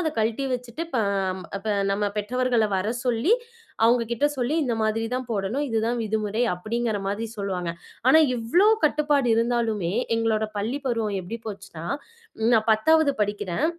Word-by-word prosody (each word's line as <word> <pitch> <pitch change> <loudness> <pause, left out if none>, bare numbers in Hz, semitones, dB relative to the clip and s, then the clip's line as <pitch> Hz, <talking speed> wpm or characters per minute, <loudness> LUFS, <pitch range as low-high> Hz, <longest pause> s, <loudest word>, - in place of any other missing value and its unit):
அத 320 -3 0
கழட்டி 225 +5 0
வச்சுட்டு, 245 +4 -5
ப - - +3 0.6
இப்ப 215 - -6 0.2
நம்ம 200 +1 0
பெற்றவர்கள 245 +2 +1
வர 190 +3 -1 0.2
சொல்லி, 245 - +2 0.5
அவங்க 235 +1 +4
கிட்ட 235 +4 0
சொல்லி, 255 +3 0
இந்த 240 -3 0
மாதிரிதான் 225 +4 -1
போடணும், 220 +7 -1
இதுதான் 230 +1 0
விதிமுறை, 215 +1 -1
அப்படிங்கிற 220 +4 -2
மாதிரி 205 +3 -2
சொல்லுவாங்க. 185 -4 -2 0.4
ஆனா 315 - +8 0.2
இவ்ளோ 240 - +3 0.2
கட்டுப்பாடு 295 -3 +2
இருந்தாலுமே, 230 -6 0 0.2
எங்களோட 225 -1 +1
பள்ளி 225 +7 -1
பருவம் 225 -5 0
எப்படி 185 +6 -6
போச்சுன்னா, 195 -6 -7 0.6
ன் 225 - +3
நான் 220 0 +2
10வது 305 +6 +4
படிக்கிறேன். 205 - -1
225 Hz, 145 wpm, -25 LUFS, 210-245 Hz, 0.6 s, ஆனா